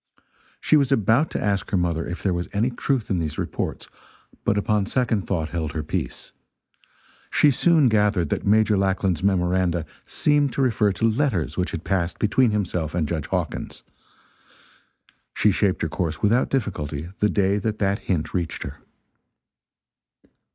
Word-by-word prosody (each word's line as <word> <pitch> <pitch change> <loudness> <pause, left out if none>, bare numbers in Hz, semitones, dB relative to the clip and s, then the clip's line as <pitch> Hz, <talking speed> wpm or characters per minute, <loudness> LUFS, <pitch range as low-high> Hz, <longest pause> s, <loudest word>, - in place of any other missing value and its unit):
She 155 - +3
was 140 -3 +1
about 120 - +3
to - - -3
ask 100 -2 -1
her 95 - +1
mother 85 -2 -1
if 85 - -6
there 95 - +1
was 85 0 -3
any 110 +5 +1
truth 125 -2 -1
in 90 - +1
these 75 -2 -3
reports, - - -4 0.6
but 100 - +1
upon 105 -1 +1
second 115 -8 0
thought 80 -5 -1
held 80 -3 -3
her 80 -1 -3
peace. 75 - -4 1.0
She 150 - +4
soon 160 +2 +4
gathered 105 - +2
that - - -2
Major 105 +1 +3
Lackland's 95 -3 0
memoranda 90 -3 +1 0.2
seemed 145 -2 +1
to - - -1
refer 110 -5 +2
to 115 - +1
letters 110 - 0
which - - -1
had - - -5
passed 90 -3 -1
between 115 +4 +3
himself 90 -6 -2
and 80 -4 0
Judge 80 -2 -3
Hawkins. - - -4 1.5
She 105 - +3
shaped 95 -2 0
her - - +1
course 80 0 -3
without 115 +5 +2
difficulty 80 - -3
the 105 - +3
day 100 0 +1
that 110 +1 -2
that 100 -1 0
hint 80 -5 -2
reached 85 -3 -2
her. - - -8
100 Hz, 160 wpm, -23 LUFS, 85-110 Hz, 1.5 s, She